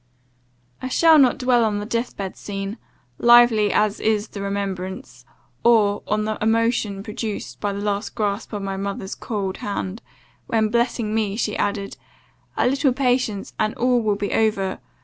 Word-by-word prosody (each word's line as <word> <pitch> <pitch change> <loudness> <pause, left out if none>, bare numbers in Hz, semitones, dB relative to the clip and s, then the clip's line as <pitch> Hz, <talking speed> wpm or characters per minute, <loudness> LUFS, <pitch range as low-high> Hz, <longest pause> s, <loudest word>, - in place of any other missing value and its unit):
"I 255 - -3
shall 320 +4 +5
not 260 -3 +4
dwell 250 -2 +3
on 215 -2 +1
the 205 - -4
death 235 +2 -3
bed 195 -2 -5
scene, 195 +2 -5 0.4
lively 235 -3 +6
as 210 0 +1
is 215 -1 0
the 200 - -7
remembrance, 190 -10 -4 0.4
or 210 -4 +4
on 210 0 0
the 215 0 -3
emotion 225 -2 +1
produced 215 0 -5
by 205 - -1
the 200 0 -4
last 205 0 -2
grasp 205 0 -2
of 205 -2 -4
my 195 -1 -3
mother's 195 0 -4
cold 200 -4 -4
hand; 200 +1 -4 0.5
when 220 -1 +1
blessing 235 -1 0
me, 215 -3 0
she 215 -1 -1
added, 200 -1 -2 0.6
'A - - +2
little 270 +1 +2
patience, 250 -6 0
and 215 0 0
all 245 0 +2
will 210 -2 +1
be 200 0 -3
over! 200 -4 +1
210 Hz, 165 wpm, -22 LUFS, 200-235 Hz, 0.6 s, lively